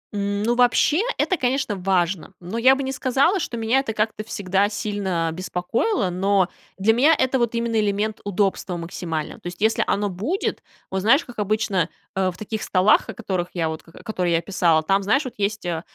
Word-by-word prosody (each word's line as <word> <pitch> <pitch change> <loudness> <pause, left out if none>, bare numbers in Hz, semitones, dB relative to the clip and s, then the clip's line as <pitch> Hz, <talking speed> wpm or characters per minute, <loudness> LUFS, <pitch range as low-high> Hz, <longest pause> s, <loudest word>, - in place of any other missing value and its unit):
Ну, 205 +3 0
вообще, 250 +6 +3 0.2
это, 370 - +1
конечно, 255 -5 0
важно, 185 -1 0
но 180 +6 -5
я 260 +3 +6
бы 275 - -3
не 265 - -2
сказала, 270 +8 +2
что 245 -7 -4
меня 230 +3 +2
это 270 -5 -3
как-то 215 0 -1
всегда 200 -2 0
сильно 200 -6 -2
беспокоило. 185 - -1
Но 190 0 +2 0.3
для 205 +4 +3
меня 285 +8 +5
это 260 0 +1
вот 235 -1 0
именно 230 -1 0
элемент 210 +1 -1
удобства 195 -2 -1
максимального. 165 -2 -5
То - - -7
есть, 175 0 -7
если 220 +2 +2
оно 205 0 +1
будет, 225 - -2 0.3
вот 190 - -1
знаешь, 250 - +4
как 245 -3 -10
обычно, 205 -4 0 0.3
э, 190 -1 +1
в 180 - -8
таких 215 +1 -5
столах, 190 +3 +3
о - - -4
которых 185 -6 -2
я 165 -2 0
вот, 160 0 -5
к 165 - -19
которые 180 -5 -1
я 165 - +3
описала, 170 -3 +2
там, 195 +5 +2
знаешь, 225 +9 +1
вот 255 - -6
есть, 205 0 -2
э, 170 -2 -2
205 Hz, 195 wpm, -23 LUFS, 185-230 Hz, 0.3 s, я